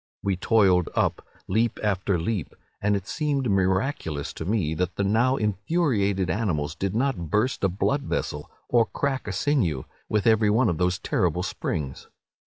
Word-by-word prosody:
"We 100 -1 +1
toiled 95 -3 +3
up, - - +1 0.2
leap 115 +5 +1
after 100 -2 +1
leap; 95 +2 -3 0.3
and 105 0 +2
it 95 -1 -3
seemed 140 -5 -1
miraculous 95 - 0
to 80 - -6
me 95 -6 0
that 90 +3 -2
the 100 - 0
now 115 +6 +3
infuriated 105 - 0
animals 80 -7 -1
did 95 +3 -3
not 120 - 0
burst 110 - 0
a 95 - +4
blood 135 +10 0
vessel, 75 - -3 0.2
or 115 -2 +3
crack 135 -4 -2
a - - -2
sinew, 95 - +1 0.3
with 105 -2 +1
every 110 -2 +4
one 115 +2 +3
of 85 - -2
those 90 0 +2
terrible - - 0
springs. 70 -4 -4
100 Hz, 165 wpm, -25 LUFS, 90-115 Hz, 0.3 s, a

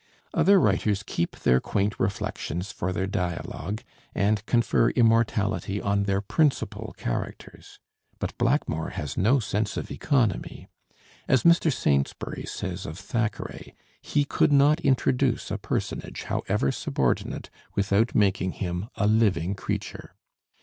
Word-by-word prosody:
Other 200 0 +5
writers 105 - +1
keep 85 -5 -2
their 65 +1 +4
quaint 100 +7 -1
reflections 95 -1 -2
for 95 - -3
their 95 +1 -1
dialogue, 95 +2 -3 0.3
and 105 +1 +1
confer 120 -1 +3
immortality 110 -5 +2
on 100 0 0
their 100 0 +1
principal 145 +7 0
characters. - - -5 0.4
But - - -4
Blackmore 120 - +1
has 75 -3 -4
no 115 +9 +4
sense 105 -2 -2
of - - -4
economy. 125 - 0 0.6
As 130 -3 +3
Mr. 170 -1 +5
Saintsbury 70 - -1
says 95 -2 -5
of 80 +2 -6
Thackeray, 110 +3 -4 0.3
he 145 -1 +1
could 140 - +2
not 145 +3 +5
introduce 130 -2 +1
a - - -2
personage, - - -3
however 70 - 0
subordinate, - - -1 0.2
without 100 +3 +2
making 95 -3 +2
him 90 +3 -4
a 105 - 0
living 100 -5 +2
creature. 100 - -5
100 Hz, 125 wpm, -26 LUFS, 95-120 Hz, 0.6 s, Other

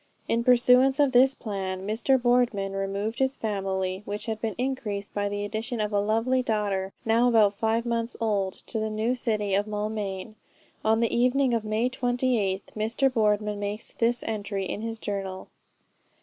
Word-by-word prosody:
In 230 +1 +1
pursuance 250 +2 +5
of 285 -2 +4
this 260 +2 +5
plan 190 -4 -4
Mr. 230 +6 +2
Boardman 240 -5 +2
removed 195 +3 -3
his 265 0 +1
family, 190 -3 -2
which 205 0 -5
had 220 -2 -4
been 220 -4 -2
increased 230 -6 -3
by 205 0 -1
the 205 0 -3
addition 225 +3 -3
of 210 0 -1
a 205 - +3
lovely 225 +5 +1
daughter, 205 -5 -1
now 230 +2 +4
about 215 -4 +4
five 225 +3 0
months 235 0 -2
old, 200 -4 0
to 225 - -2
the 215 0 -1
new 215 +3 0
city 215 -5 -1
of 200 +2 +1
Maulmain. 210 -1 -3 0.5
On 220 +1 +3
the 230 - +1
evening 250 +2 +3
of 230 -2 0
May 215 +3 0
28th 245 -6 -1
Mr. 230 +5 +1
Boardman 210 -2 +1
makes 205 +1 -4
this 235 +1 +1
entry 205 -3 -3
in 205 - -4
his 225 0 -4
journal. 195 -3 -5
220 Hz, 170 wpm, -26 LUFS, 205-240 Hz, 0.5 s, pursuance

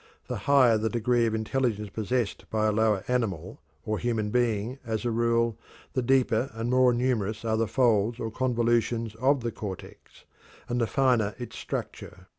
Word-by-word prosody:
The - - -4
higher 125 -6 +5
the 110 +1 0
degree 120 0 +1
of 110 - -1
intelligence 110 -2 -1
possessed 115 0 -2
by 110 -1 0
a 110 - +3
lower 105 -2 +1
animal 115 -10 -2 0.3
or 110 -1 -1
human 110 -3 -1
being, 120 +1 0
as 110 +1 -3
a 120 - +1
rule, 115 0 +1 0.3
the 130 - 0
deeper 125 -1 +2
and 115 +2 -2
more 130 0 +5
numerous 115 -3 -1
are 110 -1 +1
the 115 0 +1
folds 115 -2 +2
or 110 - -3
convolutions 115 -2 0
of 135 +3 +2
the 115 0 -2
cortex, 100 -5 -9 0.4
and 120 0 -1
the 115 - +1
finer 125 -6 +2
its 120 -1 -8
structure. - - -6
115 Hz, 170 wpm, -27 LUFS, 110-125 Hz, 0.4 s, higher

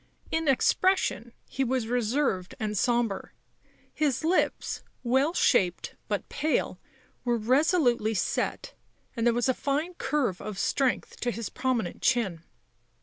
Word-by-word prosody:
In 320 -1 0
expression 275 - +2 0.2
he 270 - -1
was 255 -2 0
reserved 235 -5 0
and 210 -1 -2
sombre; 235 -1 0 0.6
his 300 -3 0
lips 345 +4 0 0.2
well 265 +5 +2
shaped 180 -2 +2
but - - -2
pale, 310 +1 -1 0.4
were 240 -1 +1
resolutely 245 - +2
set, - - -1 0.4
and 230 0 +1
there 235 - +4
was 240 +1 +1
a 260 - +3
fine 295 +7 -1
curve 270 - -1
of 210 -2 -6
strength 260 +4 0
to 245 - -1
his 230 -2 -4
prominent 245 -8 -1
chin. 210 -10 +1
245 Hz, 130 wpm, -28 LUFS, 220-280 Hz, 0.6 s, there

